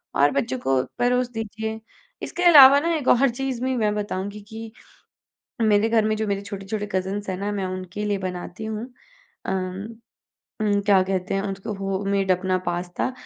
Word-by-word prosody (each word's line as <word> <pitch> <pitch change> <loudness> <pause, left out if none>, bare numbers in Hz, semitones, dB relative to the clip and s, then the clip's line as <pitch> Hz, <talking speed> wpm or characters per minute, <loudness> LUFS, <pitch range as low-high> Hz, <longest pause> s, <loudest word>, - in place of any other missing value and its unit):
और 145 +1 +4
बच्चों 130 -2 -1
को 130 +1 +1 0.2
परोस 250 0 +2
दीजिए। 220 0 -4 0.4
इसके 355 - -3
अलावा 285 -5 +9
ना 335 +3 0
एक 290 -5 -3
और 270 +2 +5
चीज़ 250 0 -3
भी 260 0 0
मैं 210 -2 +1
बताऊँगी 205 0 -4
कि 225 0 -8 0.9
मेरे 215 0 +3
घर 225 -1 +3
में 215 - +1
जो 220 0 -2
मेरे 200 0 -1
छोटे-छोटे 200 +1 -5
कज़िन्स 190 +2 -2
हैं 185 - -2
ना 200 +1 -2
मैं 200 -2 -2
उनके 185 +2 -5
लिए 205 -1 0
बनाती 180 +1 -6
हूँ 220 0 -4 0.6
अम, 185 0 -2 0.8
उम, 205 -1 +2
क्या 200 -3 +5
कहते 185 0 -2
हैं 195 - +1
उनको? 195 +1 -4
होममेड 195 0 -1
अपना 185 0 +1
पास्ता, 175 +7 -2
205 Hz, 170 wpm, -23 LUFS, 190-220 Hz, 0.9 s, अलावा